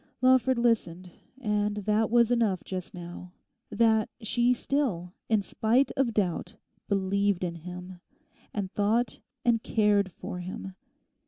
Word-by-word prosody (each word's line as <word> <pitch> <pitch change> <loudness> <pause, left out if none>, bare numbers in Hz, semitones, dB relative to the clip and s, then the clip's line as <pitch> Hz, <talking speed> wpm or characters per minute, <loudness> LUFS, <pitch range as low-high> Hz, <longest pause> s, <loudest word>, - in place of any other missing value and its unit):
Lawford 255 0 +4
listened; 185 -7 0 0.3
and 210 -3 0
that 210 +1 +1
was 235 0 +4
enough 220 -7 +1
just 185 -2 -5
now—that 180 +5 -2
she 240 +2 +2
still, 235 -9 -1 0.2
in 215 -3 +3
spite 235 +7 +2
of 265 -3 +1
doubt, 185 -5 -1 0.3
believed 200 -1 +1
in 175 -2 -1
him, 180 +2 -9 0.5
and 195 -3 -3
thought 215 +3 +1 0.3
and 235 -2 +3
cared 205 -4 +2
for 180 - -6
him. 185 +1 -6
210 Hz, 120 wpm, -28 LUFS, 185-235 Hz, 0.5 s, Lawford